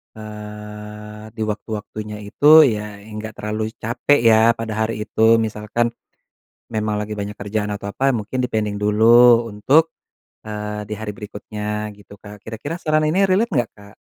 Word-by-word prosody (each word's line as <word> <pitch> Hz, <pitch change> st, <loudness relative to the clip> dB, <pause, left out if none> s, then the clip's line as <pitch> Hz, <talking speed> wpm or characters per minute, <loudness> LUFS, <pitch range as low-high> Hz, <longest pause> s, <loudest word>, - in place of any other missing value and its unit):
eee, 105 Hz, 0 st, -9 dB
di 110 Hz, -, -2 dB
waktu-waktunya 105 Hz, 0 st, -5 dB
itu 150 Hz, +10 st, +7 dB
ya, 105 Hz, -5 st, -1 dB
enggak 110 Hz, +1 st, -8 dB
terlalu 110 Hz, +1 st, -4 dB
capek 120 Hz, +5 st, +1 dB
ya, 115 Hz, 0 st, +5 dB
pada 115 Hz, -1 st, -5 dB, 0.2 s
hari 110 Hz, -1 st, -4 dB
itu, 110 Hz, +2 st, +4 dB
misalkan 110 Hz, +1 st, -1 dB, 0.8 s
memang 105 Hz, -1 st, -1 dB
lagi 105 Hz, 0 st, -5 dB
banyak 100 Hz, 0 st, -4 dB
kerjaan 105 Hz, +1 st, -2 dB
atau 100 Hz, 0 st, -5 dB
apa, 135 Hz, +6 st, +1 dB
mungkin 120 Hz, +3 st, -2 dB
di-pending 105 Hz, -3 st, -2 dB
dulu 115 Hz, +3 st, +5 dB
untuk, 140 Hz, +10 st, +3 dB, 0.6 s
eee, 105 Hz, 0 st, -4 dB
di -, -, -3 dB
hari 110 Hz, -1 st, -5 dB
berikutnya 105 Hz, 0 st, -5 dB
gitu, 100 Hz, 0 st, -16 dB
Kak. 105 Hz, -1 st, -12 dB
Kira-kira 115 Hz, +10 st, -6 dB
saran 155 Hz, 0 st, +2 dB
ini 180 Hz, +6 st, +3 dB
relate 205 Hz, +5 st, +2 dB
nggak, 120 Hz, -6 st, +1 dB
Kak? 100 Hz, 0 st, -16 dB
110 Hz, 150 wpm, -20 LUFS, 105-115 Hz, 0.8 s, itu